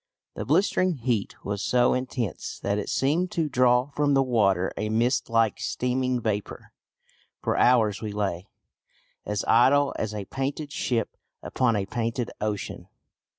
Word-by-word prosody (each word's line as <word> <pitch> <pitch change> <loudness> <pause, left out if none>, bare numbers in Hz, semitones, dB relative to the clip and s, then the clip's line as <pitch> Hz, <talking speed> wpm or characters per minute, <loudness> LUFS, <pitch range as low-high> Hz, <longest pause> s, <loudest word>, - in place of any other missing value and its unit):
The - - -5
blistering 185 -2 +2
heat 115 -5 -2
was 100 0 -2
so 125 +2 +3
intense 125 -7 -3
that 100 +1 0
it 105 - -4
seemed 160 +7 +1
to 165 -2 0
draw 125 0 +3
from 145 0 +1
the 135 - +4
water 100 -7 +1
a 105 - -2
mist 120 +4 +1
like 115 -2 +2
steaming 125 0 -1
vapour. 105 -3 -4 0.7
For - - 0
hours 110 -5 +3
we 110 -2 -4
lay 100 -4 -3 0.8
"As 105 -1 -2
idle 135 +4 +4
as 110 -1 -3
a 100 -2 -4
painted 140 +5 -4
ship 120 -6 -1 0.3
Upon 125 -3 +1
a 100 -2 -1
painted 115 +3 -3
ocean." 105 -1 -4
120 Hz, 150 wpm, -26 LUFS, 105-130 Hz, 0.8 s, the